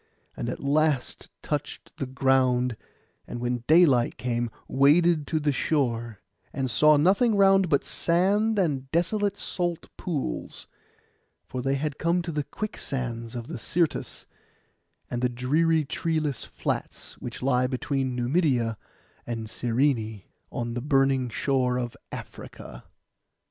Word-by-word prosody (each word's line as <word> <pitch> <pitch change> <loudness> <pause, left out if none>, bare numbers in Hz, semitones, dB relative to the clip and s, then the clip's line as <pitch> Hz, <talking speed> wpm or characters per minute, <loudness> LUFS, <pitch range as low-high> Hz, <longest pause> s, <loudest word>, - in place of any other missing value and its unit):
And 120 - -3
at - - -4
last 145 -2 0
touched - - -4
the 135 - -3
ground, 130 -2 +2 0.5
and 120 - -6
when 120 0 -2
daylight 155 -7 +5
came 120 -1 -1 0.2
waded 150 +3 +4
to 160 - 0
the 150 -1 +1
shore; 120 -7 -1 0.3
and 130 -3 -2
saw 150 0 +6
nothing 200 +9 +3
round 195 -2 +5
but 140 - +2
sand 200 +6 +2
and 140 -8 0
desolate 200 +5 0
salt 175 -3 -3
pools, 145 - -4 0.8
for 130 - -5
they 135 +2 0
had 145 0 -3
come 170 +2 +1
to 170 - -4
the 150 -2 -1
quicksands 125 - -4
of 120 -1 -4
the 120 - -6
Syrtis, 165 +7 -1 0.8
and 120 - -3
the 125 - +2
dreary 150 +6 +1
treeless 155 -3 -1
flats - - -5
which 120 0 -7
lie 125 -1 +2
between 130 0 -2
Numidia 125 - +1 0.5
and 115 -2 -4
Cyrene, 115 -4 0 0.3
on 120 -1 -3
the 120 - -3
burning 135 -2 +2
shore 125 +1 0
of 120 -1 -3 0.2
Africa. - - -9
135 Hz, 130 wpm, -26 LUFS, 125-160 Hz, 0.8 s, saw